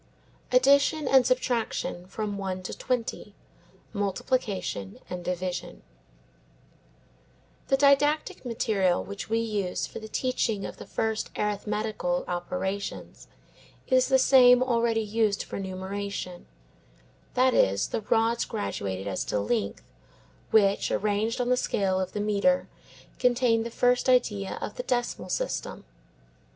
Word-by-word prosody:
ADDITION 280 +3 +4
AND 265 -2 +5
SUBTRACTION 235 -7 -1
FROM 205 +1 -4
ONE 185 -1 -4
TO - - -5
TWENTY: 250 -3 -3 0.6
MULTIPLICATION 200 - -2
AND 180 -1 -4
DIVISION 180 0 -4 1.8
The 270 - +3
didactic 290 +2 +3
material 215 -7 +1
which 200 +1 -7
we 225 - +1
use 210 -5 -1
for - - -8
the 220 - -8
teaching 225 -3 -1
of - - -7
the - - -10
first 220 -1 -2
arithmetical 210 -3 -1
operations 190 +2 -4 0.6
is 255 0 +3
the 265 - +4
same 255 -1 +6
already 235 -3 +1
used 215 -1 0
for - - -6
numeration; 190 -1 -5 0.9
that 255 0 +4
is, 100 +1 +2
the - - -2
rods 225 +2 +1
graduated 100 - -4
as 95 -2 -2
to 105 - -1
length 100 - -2 0.7
which, 200 -2 +3
arranged 210 +3 0
on 245 0 0
the 250 - +4
scale 190 -6 0
of 185 -1 -3
the 210 - -3
metre, 210 +7 +2 0.5
contain 245 -2 +3
the 230 - -4
first 245 +2 +2
idea 210 -6 +1
of - - -5
the - - -1
decimal 240 - -2
system. - - -3
215 Hz, 125 wpm, -27 LUFS, 190-250 Hz, 1.8 s, same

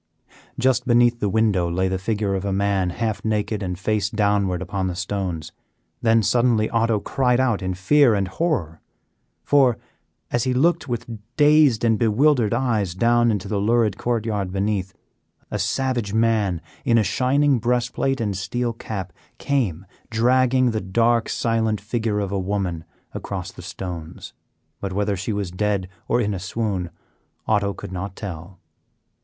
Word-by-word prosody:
Just 125 0 +1
beneath 120 -1 +4
the 105 - 0
window 100 -4 +2
lay 95 +2 0
the 95 0 -2
figure 105 0 -1
of 95 -1 -2
a 100 - -2
man 100 -1 +1
half 105 +1 -3
naked 105 -1 -1
and 90 -2 -3
face 105 +1 0
downward 100 -4 +1
upon 95 +1 -3
the 90 - -3
stones. 95 -4 -3 0.5
Then 115 -1 +3
suddenly 115 0 +2
Otto 115 -2 +2
cried 125 +2 +1
out 120 -6 +1
in 95 0 -2
fear 120 +6 +4
and 100 -2 0
horror, 95 - -2 0.6
for, 135 -5 +4 0.5
as 120 - +1
he 130 -1 0
looked 160 +3 +2
with 120 -3 -3 0.3
dazed 150 -6 +5
and 115 -2 +2
bewildered 120 0 +3
eyes 115 -7 0
down 120 +3 +3
into 105 -3 -1
the 100 0 -1
lurid 110 -1 +2
court 120 -2 -1
yard 100 -4 -2
beneath, 100 -1 -1 0.6
a 105 - -2
savage 115 0 -1
man, 110 -6 +1 0.2
in 115 - +3
a 110 - +4
shining 135 +4 +2
breast 120 +1 0
plate 135 -1 0
and 105 -4 -1
steel 115 +5 -2
cap, 95 -6 -6 0.2
came 105 - -1 0.2
dragging 125 +2 +3
the 110 -1 -2
dark, 115 +5 +1
silent 110 -2 0
figure 110 -1 -2
of 100 -2 -2
a 100 - -1
woman 95 -4 -2 0.3
across - - -5
the - - -11
stones; 85 -4 -7 0.5
but 100 -2 -4
whether 100 +1 0
she 95 +4 -3
was 100 -3 -3
dead 100 0 -1 0.2
or - - +2
in 105 -3 0
a 95 - -4
swoon, 95 -2 -2 0.6
Otto 100 -2 +1
could - - -8
not 95 +1 -5
tell. 90 -2 -8
105 Hz, 160 wpm, -22 LUFS, 95-120 Hz, 0.6 s, dazed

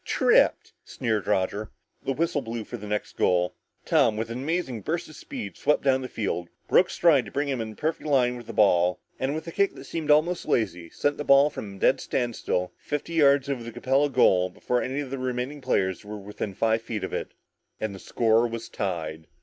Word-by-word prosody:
Tripped!" - - +3
sneered 110 -4 -2
Roger. 100 +3 0 0.3
The 135 - -1
whistle 155 0 0
blew 115 -2 -5
for 120 - -7
the 105 -3 -8
next 105 0 -3
goal. 90 0 +2 0.3
Tom, 110 -2 +3
with 115 +1 -3
an 120 +2 -4
amazing 140 -6 -2
burst 165 - -2
of 155 - -13
speed, 260 - -7
swept 150 - +1
down 130 -1 +3
the 130 - -4
field, 95 -7 -3 0.2
broke - - +4
stride 155 -7 +4
to - - -10
bring 145 +1 -1
him 135 -4 -1
in 110 -1 -6
perfect 155 0 -2
line 125 -3 +3
with 120 -2 -10
the - - -5
ball 90 -3 +3 0.2
and 135 +3 -1
with 155 - -5
a 165 - -6
kick 200 +3 +1
that - - -10
seemed 160 -3 -5
almost 155 +4 +3
lazy, 90 -7 0
sent 145 0 -1
the 145 - -3
ball 140 +1 +6
from 100 -2 -7
a - - -13
dead - - +3
standstill, 110 -6 -1
fifty 150 +3 -4
yards 140 -4 +4
over 135 -3 -2
the 115 0 -7
Capella 135 +5 +1
goal 95 -9 +4
before 125 +5 -1
any 135 +3 -2
of 135 -3 -7
the 135 - -3
remaining 130 +3 -3
players 95 -6 0
were 105 +1 -7
within 100 0 -6
five 110 +2 +2
feet 115 -2 -4
of - - -4
it, - - -4 0.4
and 110 -2 -3
the 95 - -9
score 115 +3 +2
was 115 0 -6
tied. 80 -5 -4
120 Hz, 215 wpm, -26 LUFS, 105-145 Hz, 0.4 s, ball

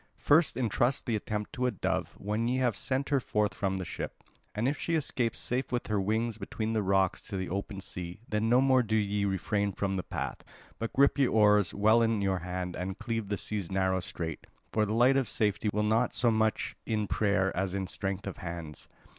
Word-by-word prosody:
First 155 +3 +3
entrust 120 +2 +1
the 115 - 0
attempt 105 0 -3
to 125 0 0
a - - +3
dove 110 - -2
when 105 +3 -1
ye 125 +2 +1
have 125 -4 +1
sent 135 +1 -1
her 140 -2 +3
forth 105 -4 0
from 95 -1 -1
the 95 - -4
ship. - - -6 0.3
And 110 +4 +1
if 145 +2 -1
she 165 - 0
escapes 130 -6 -1
safe 125 +2 -2
with 120 -1 -1
her 105 -2 0
wings 110 +3 -1
between 110 +2 -3
the 110 - +1
rocks 95 -1 +2
to 100 - -4
the 95 -1 -3
open 100 +1 -4
sea, 90 -1 -6
then 105 +1 0
no 125 +2 +5
more 130 -1 +5
do 110 -2 -1
ye 100 -1 0
refrain 100 +1 0
from 95 0 -1
the - - 0
path, - - -4 0.4
but 115 - -3
grip 140 +1 +4
your 135 - +3
oars 105 -3 +4
well 110 +3 +5
in 115 -2 +2
your 95 -2 +1
hands 90 +1 -4
and 95 +2 -4
cleave 115 -3 -3
the 100 - -1
sea's 100 -4 -3
narrow 95 -1 +1
strait, 85 -3 -4 0.3
for 110 -1 +2
the 105 - -1
light 125 +4 +5
of 130 -5 0
safety 105 0 +1
will 105 +1 0
be 105 - +1
not 115 +3 +2
so 120 -2 +3
much 110 -1 0
in 110 -2 -1
prayer 100 -2 +1
as 95 0 -1
in 95 -1 -1
strength 95 +1 -3
of 100 - -5
hands. 85 -4 -6
105 Hz, 220 wpm, -30 LUFS, 95-115 Hz, 0.4 s, no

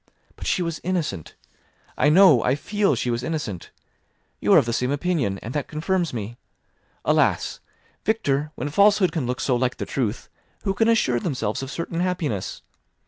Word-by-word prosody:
But - - -7
she 180 - +1
was 165 -2 -4
innocent. 165 - -3 0.6
I 150 - +3
know, 155 -6 +7
I 125 - +2
feel 200 +1 0
she 120 +1 -1
was 120 0 -1
innocent; 125 - -4 0.7
you - - +1
are - - +8
of - - +4
the 115 - -2
same 125 +2 0
opinion, 145 - 0
and 115 - -6
that 145 -3 -2
confirms 170 +3 -1
me. 115 0 -5 0.7
Alas! - - +2 0.4
Victor, 150 -9 0
when 140 +4 -3
falsehood 200 +3 +4
can 150 -7 -2
look 125 0 -2
so 130 - +1
like 125 +1 0
the - - -3
truth, 120 -4 -2 0.4
who 195 - 0
can 225 +3 +2
assure 130 - +2
themselves 115 -7 -2
of 135 - -5
certain 165 +3 -4
happiness? 170 - -2
145 Hz, 175 wpm, -23 LUFS, 120-180 Hz, 0.7 s, are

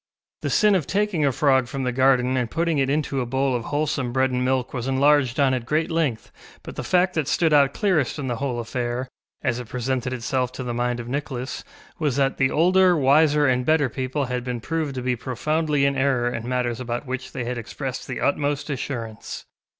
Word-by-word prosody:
The - - -2
sin 210 -2 +4
of 180 -7 +1
taking 195 -7 +1
a - - +3
frog 130 -1 +2
from 135 +2 -4
the 125 - 0
garden 130 0 +3
and 125 -3 0
putting 165 0 0
it 135 -1 +1
into 140 -2 0
a - - -2
bowl 135 +1 0
of 120 -1 -3
wholesome 145 -4 -1
bread 130 +1 +1
and 125 0 0
milk 130 -1 0
was 125 -1 -3
enlarged 135 -1 +3
on 135 -2 +4
at 125 -2 -1
great 155 +5 0
length, 155 -9 -1 0.3
but - - -9
the - - -4
fact 180 0 +2
that 155 -4 -1
stood 160 -1 +2
out 140 -2 +4
clearest 180 - +1
in 145 - -4
the 120 -2 -2
whole 130 -2 -2
affair, 120 +2 -3 0.4
as 120 - 0
it 125 - -7
presented 125 0 -2
itself 125 0 -1
to 130 - -5
the 120 -1 -3
mind 120 0 -1
of 120 - -6
Nicholas, 130 -1 -4 0.4
was 150 -5 0
that 135 -1 +1
the 130 -1 +3
older, 180 +3 +4
wiser, 150 +1 +4
and 125 -2 +2
better 155 -2 +2
people 130 +4 -2
had 125 -1 -3
been 125 -1 -3
proved 155 +2 -3
to 125 - -4
be 125 -1 +1
profoundly 150 +4 0
in 140 0 +1
error 130 -3 +1
in 115 +2 -4
matters 125 -2 -1
about 120 +1 -4
which 130 0 -5
they 130 - -4
had 120 0 -3
expressed 130 +3 -5
the - - -4
utmost 145 +1 0
assurance. 120 -5 -5
130 Hz, 220 wpm, -23 LUFS, 125-145 Hz, 0.4 s, sin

